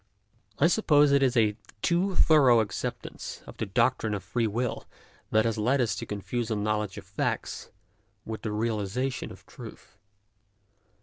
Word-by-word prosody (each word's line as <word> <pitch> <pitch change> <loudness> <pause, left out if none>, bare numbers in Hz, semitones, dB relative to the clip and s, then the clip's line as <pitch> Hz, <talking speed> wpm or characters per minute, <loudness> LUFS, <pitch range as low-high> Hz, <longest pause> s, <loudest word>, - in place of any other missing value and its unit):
I 140 - +4
suppose 150 -6 +4
it 140 0 +4
is 130 -2 +2
a 105 -2 +3 0.3
too 180 +2 +1
thorough 135 -9 +6
acceptance 110 -2 -4
of - - -12
the - - -3
doctrine 110 -2 +1
of 100 - -5
free 115 -2 0
will 120 +3 -3 0.4
that 110 +1 +3
has 115 -1 0
led 125 +6 +2
us 115 -6 +1
to - - -5
confuse 110 +3 -3
a 110 - 0
knowledge 105 -1 -1
of 100 - -8
facts 95 +1 -3 0.6
with 110 0 -5
the 110 - -3
realization 110 +4 -2
of - - -14
truth. 100 - -12
115 Hz, 160 wpm, -28 LUFS, 105-135 Hz, 0.6 s, thorough